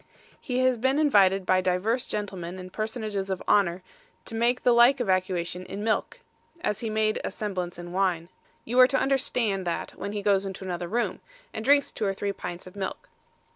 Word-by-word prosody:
He 250 -4 -3
has 255 -2 +2
been 265 +4 +2
invited 195 -11 +4
by 185 0 +3
divers 190 +7 0
gentlemen 185 -4 -4
and 185 0 -9
personages 215 -3 -3
of 190 -1 -3
honour 185 -3 +3 0.4
to - - -8
make 235 +2 +1
the 245 - +5
like 240 +3 +6
evacuation 185 -4 -1
in 200 +2 -5
milk, 225 - -1 0.4
as 210 - -1
he 230 - -3
made 215 0 0
a - - -2
semblance 185 -4 -4
in 175 0 -8
wine. 180 -3 0 0.4
You 245 +3 +1
are 255 - +9
to 270 - +1
understand 235 -8 0
that 170 - -2
when 200 +2 -6
he 205 -1 -3
goes 200 -1 +3
into 195 -1 -6
another 175 -1 -3
room, 235 +5 -1 0.3
and 220 - -4
drinks 280 +2 +4
two 215 - -3
or 195 -1 0
three 200 +1 -2
pints 175 -2 -7
of 185 - -12
milk. 195 -2 -5
200 Hz, 195 wpm, -27 LUFS, 185-235 Hz, 0.4 s, are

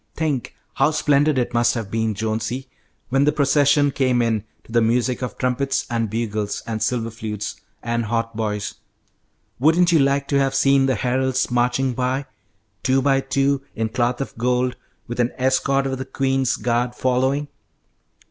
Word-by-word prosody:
"Think 150 -6 -2 0.2
how - - +3
splendid 150 -1 +2
it 125 -1 0
must 120 +1 +3
have 110 -4 -4
been, 110 -1 0
Jonesy, 110 +4 -3 0.4
when 135 +2 +3
the 150 - +4
procession 145 0 +3
came 130 -2 +1
in 115 -3 +1 0.2
to - - -16
the 115 0 +3
music 120 +3 +1
of 125 -4 -4
trumpets 130 +2 0
and 115 -2 0
bugles 110 -2 -2
and 110 -1 -4
silver 115 -2 -1
flutes 110 -2 -5 0.2
and 115 -1 -1
hautboys! 110 -2 -2 0.9
Wouldn't 165 +6 +4
you 165 - +5
like 140 0 +2
to 140 - +3
have 135 -1 +1
seen 135 0 +4
the 130 - +2
heralds 130 +3 0
marching 125 +2 +1
by, 130 +3 -1 0.6
two 130 0 +2
by 135 -1 +3
two, 135 +1 +1
in 110 0 -1
cloth 120 +1 0
of 135 - -5
gold, 125 +1 +1 0.3
with 120 0 -6
an 120 0 +1
escort 135 +1 +1
of 130 -1 -2
the 130 - -4
queen's 135 -1 0
guard 120 +1 -1
following? 130 +3 +1
125 Hz, 165 wpm, -22 LUFS, 115-135 Hz, 0.9 s, you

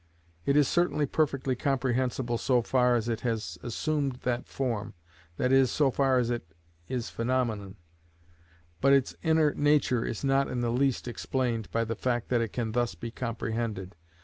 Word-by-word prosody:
It 140 +1 +4
is 145 -3 +5
certainly 175 -4 +2
perfectly 140 -3 0
comprehensible 125 -2 0
so 125 -3 +2
far 125 0 +3
as 115 -1 0
it 115 -1 -2
has 110 -8 -3
assumed 140 - -1
that 125 -1 -1
form, 115 -5 -3 0.4
that 125 - +1
is, 135 -1 +5
so 145 -3 +2
far 135 0 +2
as 120 -1 +1
it 85 -9 -5 0.3
is 120 -2 -3
phenomenon, 115 -5 -1 1.1
but 140 - +5
its 135 -2 +3
inner 160 -3 +3
nature 145 -5 +2
is 115 - -4
not 135 0 +3
in 125 -1 -2
the 120 -1 0
least 130 0 +1
explained 120 -2 -2
by 115 - 0
the 115 0 -2
fact 120 0 -2
that 120 -2 +2
it 115 -3 -2
can 115 -3 -2
thus 120 +1 0
be 115 - -6
comprehended. 115 -5 -3
125 Hz, 170 wpm, -28 LUFS, 115-135 Hz, 1.1 s, is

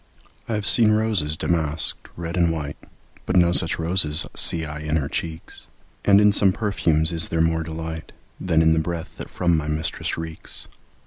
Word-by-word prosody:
I - - -1
have 105 -1 -3
seen 110 +1 +6
roses 105 -9 0
damask'd, 80 -2 -2
red 85 0 -5
and 85 -2 +2
white, 75 -3 -4 0.5
But 90 - -1
no 85 -1 +4
such 85 -1 +1
roses 80 -2 0
see 80 -1 +4
I 75 -1 -7
in 75 0 -3
her 70 -3 -1
cheeks; 80 +2 -6 0.4
And 100 0 +5
in 105 0 +5
some 100 -1 +4
perfumes 85 -7 0
is 80 -1 +5
there 80 - -2
more 80 0 +1
delight 80 0 -7 0.3
Than 80 -3 +1
in 80 0 +4
the 80 - +1
breath 80 0 -5
that - - -8
from 85 -2 0
my 75 -1 -2
mistress 80 +1 -3
reeks. 80 0 -7
80 Hz, 185 wpm, -22 LUFS, 80-90 Hz, 0.5 s, seen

